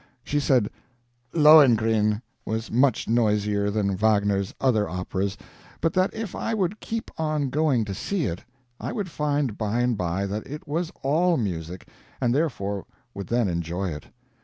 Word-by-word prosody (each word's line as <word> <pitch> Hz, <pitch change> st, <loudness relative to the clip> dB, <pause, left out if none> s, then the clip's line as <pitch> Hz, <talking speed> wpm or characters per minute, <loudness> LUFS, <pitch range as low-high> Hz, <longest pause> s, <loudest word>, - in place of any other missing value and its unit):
She 145 Hz, -, 0 dB
said 130 Hz, -6 st, +2 dB, 0.6 s
"Lohengrin" 115 Hz, -9 st, +5 dB, 0.2 s
was 110 Hz, +1 st, -3 dB
noisier 105 Hz, -5 st, +2 dB
than 100 Hz, -2 st, 0 dB
Wagner's 100 Hz, -1 st, +2 dB
other 110 Hz, -6 st, +2 dB
operas, 95 Hz, +2 st, -3 dB, 0.4 s
but 165 Hz, -, 0 dB
that 185 Hz, +1 st, +2 dB
if 220 Hz, -4 st, -5 dB
I 225 Hz, -, -2 dB
would 200 Hz, 0 st, -1 dB
keep 225 Hz, 0 st, -5 dB
on 155 Hz, -4 st, 0 dB
going 140 Hz, -6 st, +2 dB
to 100 Hz, -, -4 dB
see 175 Hz, -, -2 dB
it 90 Hz, -4 st, -4 dB, 0.4 s
I -, -, -4 dB
would 205 Hz, -7 st, -3 dB
find 145 Hz, -6 st, -1 dB
by 110 Hz, +2 st, 0 dB
and 125 Hz, -1 st, +2 dB
by 90 Hz, +1 st, -1 dB
that 105 Hz, +2 st, -4 dB
it 150 Hz, +3 st, -8 dB
was 165 Hz, +4 st, -2 dB
all 165 Hz, +5 st, +3 dB
music, 90 Hz, -5 st, -4 dB, 0.3 s
and 120 Hz, -2 st, +1 dB
therefore 100 Hz, -, -1 dB, 0.3 s
would 100 Hz, -, -6 dB
then 120 Hz, -2 st, +1 dB
enjoy 85 Hz, +2 st, -2 dB
it. 75 Hz, -, -7 dB
115 Hz, 155 wpm, -25 LUFS, 100-150 Hz, 0.6 s, Lohengrin